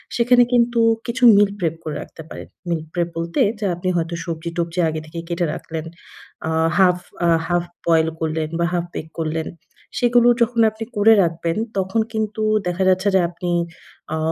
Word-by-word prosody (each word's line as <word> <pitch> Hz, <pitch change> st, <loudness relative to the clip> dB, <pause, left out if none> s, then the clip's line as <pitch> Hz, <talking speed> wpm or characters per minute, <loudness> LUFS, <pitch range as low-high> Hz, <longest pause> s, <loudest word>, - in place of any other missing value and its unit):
সেখানে 245 Hz, +1 st, +5 dB
কিন্তু 240 Hz, -1 st, +3 dB, 0.3 s
কিছু 250 Hz, +1 st, -3 dB
মিল 205 Hz, 0 st, +5 dB
প্রেপ 165 Hz, -2 st, -1 dB
করে 155 Hz, -, -4 dB
রাখতে -, -, -11 dB
পারেন। -, -, -9 dB, 0.2 s
মিল 165 Hz, -2 st, 0 dB
প্রেপ 175 Hz, -1 st, -1 dB
বলতে, 170 Hz, -, -2 dB, 0.2 s
যা 205 Hz, -, -1 dB
আপনি 185 Hz, +2 st, -3 dB
হয়তো 170 Hz, 0 st, -2 dB
সবজি-টবজি 170 Hz, +1 st, -3 dB
আগে 155 Hz, 0 st, -3 dB
থেকেই 165 Hz, +1 st, -7 dB
কেটে 170 Hz, 0 st, 0 dB
রাখলেন, 160 Hz, -1 st, -6 dB, 0.6 s
আ -, -, -1 dB, 0.3 s
হাফ 180 Hz, -2 st, +5 dB, 0.3 s
আ -, -, +4 dB, 0.2 s
হাফ 175 Hz, 0 st, +1 dB, 0.2 s
বয়েল 160 Hz, -1 st, +4 dB
করলেন 160 Hz, -1 st, -2 dB
বা 170 Hz, -, +2 dB
হাফ 175 Hz, 0 st, 0 dB
বেক 160 Hz, -, -5 dB
করলেন। 160 Hz, 0 st, -2 dB, 0.5 s
সেগুলো 240 Hz, 0 st, +4 dB
যখন 235 Hz, 0 st, +1 dB
আপনি 220 Hz, +1 st, -7 dB
করে 210 Hz, +2 st, +6 dB
রাখবেন, 165 Hz, +2 st, -2 dB, 0.2 s
তখন 190 Hz, +4 st, 0 dB
কিন্তু 220 Hz, 0 st, -2 dB, 0.3 s
দেখা 180 Hz, +2 st, 0 dB
যাচ্ছে 185 Hz, +2 st, +2 dB
যে -, -, +6 dB
আপনি 175 Hz, 0 st, -5 dB, 0.7 s
আ -, -, -2 dB
175 Hz, 170 wpm, -21 LUFS, 165-215 Hz, 0.7 s, করে